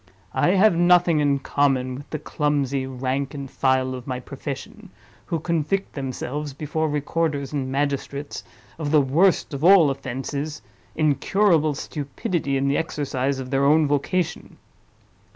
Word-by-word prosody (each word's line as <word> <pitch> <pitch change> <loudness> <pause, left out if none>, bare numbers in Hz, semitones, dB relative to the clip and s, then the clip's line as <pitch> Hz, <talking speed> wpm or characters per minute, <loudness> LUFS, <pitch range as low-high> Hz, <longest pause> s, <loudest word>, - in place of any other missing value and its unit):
I 185 - +3
have 195 -1 +5
nothing 175 -2 +4
in 145 -1 +2
common 135 -2 +1
with 140 +3 -9
the 155 - -3
clumsy 140 -3 -1
rank 135 +2 -3
and 140 -1 -5
file 130 0 +1
of 125 0 -8
my 125 -1 -3
profession, 140 - -8 0.4
who 165 -3 -1
convict 170 +4 -1
themselves, 140 +1 -4
before 155 +2 -2
recorders 145 -1 -1
and 135 -3 -2
magistrates, 140 +1 -2 0.4
of 150 -2 -2
the 155 0 +5
worst 155 +6 +2
of 140 +1 -4
all 175 -5 +7
offenses—incurable 150 +5 -1
stupidity 140 0 -3
in 135 +1 0
the 140 - +2
exercise 140 -4 -1
of 130 0 -6
their 135 0 +2
own 150 +2 +4
vocation. 145 +5 -1
145 Hz, 135 wpm, -23 LUFS, 135-160 Hz, 0.4 s, all